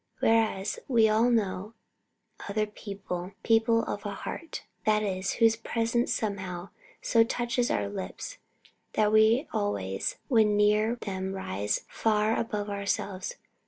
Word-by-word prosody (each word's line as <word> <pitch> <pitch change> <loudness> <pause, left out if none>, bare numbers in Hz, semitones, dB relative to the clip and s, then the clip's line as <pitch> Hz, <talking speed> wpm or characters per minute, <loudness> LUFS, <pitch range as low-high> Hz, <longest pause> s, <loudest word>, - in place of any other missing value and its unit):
Whereas, 220 -3 +2
we 230 -4 +5
all 220 +3 +3
know 210 -2 0 0.7
other 215 +1 +1
people, 195 -3 -6
people 230 0 +3
of 205 - -4
a 205 -2 -4
heart, 330 +8 -6 0.2
that 215 0 +3
is, 190 -1 -1
whose 225 -1 +4
presence 230 +1 0
somehow 190 -4 -3 0.3
so 230 -1 +5
touches 240 +1 0
our - - 0
lips 205 - -6 0.5
that 210 -1 +3
we 220 +6 +5
always 95 -2 -1
when 215 -5 +4
near 210 +2 +3
them 190 -4 -4
rise 105 - -2
far 215 0 +1
above 210 -3 -2
ourselves. 200 -1 -2
210 Hz, 125 wpm, -28 LUFS, 195-225 Hz, 0.7 s, we